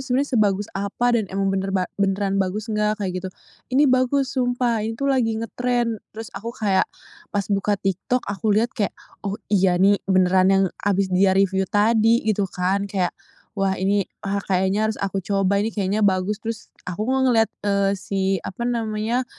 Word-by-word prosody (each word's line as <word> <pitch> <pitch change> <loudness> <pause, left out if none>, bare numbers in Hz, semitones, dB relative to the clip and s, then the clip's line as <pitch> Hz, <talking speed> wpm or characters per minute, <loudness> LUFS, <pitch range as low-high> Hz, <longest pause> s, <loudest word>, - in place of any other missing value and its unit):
sebenernya 265 +2 -1
sebagus 205 -3 +2
apa 200 +5 0
dan 220 -4 +1
emang 195 0 -1
bener 195 0 -1
ba 185 - +1 0.2
beneran 195 0 +1
bagus 210 +4 -2
enggak?" 210 0 +1
Kayak 195 -4 -3
gitu. 190 - -5 0.5
"Ini 290 - +6
bagus 255 +1 +2
sumpah, 245 -3 0
ini 225 +1 -3
tuh 275 +1 +1
lagi 225 -4 +1
ngetren." 235 0 -1 0.2
Terus 225 0 -7
aku 230 +4 -6
kayak 195 -3 +1 0.4
pas 205 -1 -1
buka 200 +1 +1
TikTok 195 +6 -1
aku 200 +2 -3
lihat 235 +4 +1
kayak, 205 -3 -2 0.2
"Oh 200 0 -3 0.2
iya 190 -2 +4
nih 195 +2 +4
beneran 185 0 +4
yang 195 0 +4 0.2
habis 195 -2 0
dia 190 +1 +4
review 190 -1 +2
tadi," 225 +2 +3
gitu 205 -3 +1
kan. 190 +3 -1
Kayak, 190 -3 -1 0.5
"Wah 195 -1 +1
ini, 195 +1 0 0.2
ah, 200 0 -1
kayaknya 190 +3 +1
harus 220 - -2
aku 195 0 -1
coba 195 +1 +1
ini 215 - 0
kayaknya 200 +1 0
bagus." 200 +1 +1
Terus 225 -1 -6 0.2
aku 195 +4 -3
kok 265 +1 +1
ngelihat, 225 -2 +3 0.2
eee, 200 -1 +2
si 195 0 -3 0.2
apa 235 +5 -5
namanya, 230 +1 -1
205 Hz, 180 wpm, -22 LUFS, 195-225 Hz, 0.5 s, Ini